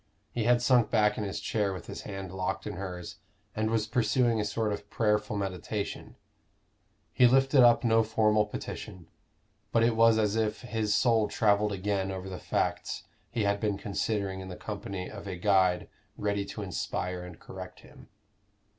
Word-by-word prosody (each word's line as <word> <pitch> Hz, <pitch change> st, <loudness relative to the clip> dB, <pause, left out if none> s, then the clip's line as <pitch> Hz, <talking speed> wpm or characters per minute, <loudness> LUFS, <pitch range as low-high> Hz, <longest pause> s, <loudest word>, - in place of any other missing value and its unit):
He 115 Hz, -3 st, -2 dB
had 120 Hz, 0 st, +4 dB
sunk 120 Hz, -4 st, +4 dB
back 105 Hz, -2 st, +3 dB
in 110 Hz, -, -3 dB
his 100 Hz, -2 st, -3 dB
chair 105 Hz, -3 st, 0 dB
with 90 Hz, -3 st, -8 dB
his -, -, -7 dB
hand 95 Hz, -3 st, -6 dB
locked 95 Hz, -1 st, -2 dB
in 105 Hz, -, -4 dB
hers, 90 Hz, -2 st, -6 dB, 0.4 s
and 110 Hz, 0 st, 0 dB
was 110 Hz, -1 st, +1 dB
pursuing 120 Hz, 0 st, +2 dB
a -, -, +1 dB
sort 105 Hz, +1 st, -1 dB
of 105 Hz, 0 st, -7 dB
prayerful 105 Hz, -1 st, +1 dB
meditation: 100 Hz, +1 st, -4 dB, 1.0 s
he 125 Hz, -, +6 dB
lifted 135 Hz, +2 st, +5 dB
up 120 Hz, 0 st, +6 dB
no 115 Hz, -1 st, +4 dB
formal 105 Hz, -1 st, +2 dB
petition, 90 Hz, -3 st, -7 dB, 0.7 s
but 115 Hz, -, +3 dB
it 115 Hz, 0 st, +3 dB
was 115 Hz, 0 st, +5 dB
as 105 Hz, -1 st, +1 dB
if 110 Hz, -1 st, 0 dB
his 110 Hz, -4 st, 0 dB
soul 110 Hz, -1 st, +3 dB
travelled 105 Hz, -1 st, +2 dB
again 100 Hz, 0 st, -1 dB
over 95 Hz, 0 st, -5 dB
the 90 Hz, -, -6 dB
facts -, -, -2 dB, 0.3 s
he 115 Hz, -, -1 dB
had 100 Hz, 0 st, +1 dB
been 105 Hz, -2 st, 0 dB
considering 100 Hz, -1 st, -2 dB
in 95 Hz, -, -7 dB
the 90 Hz, -, -7 dB
company 100 Hz, -3 st, -5 dB
of 100 Hz, -1 st, -9 dB
a 95 Hz, -, -4 dB
guide 90 Hz, -2 st, +2 dB, 0.3 s
ready 100 Hz, -1 st, -1 dB
to 105 Hz, +1 st, -6 dB
inspire 90 Hz, -1 st, -3 dB
and 90 Hz, -2 st, -10 dB
correct -, -, -9 dB
him. -, -, -16 dB
105 Hz, 175 wpm, -29 LUFS, 95-110 Hz, 1.0 s, he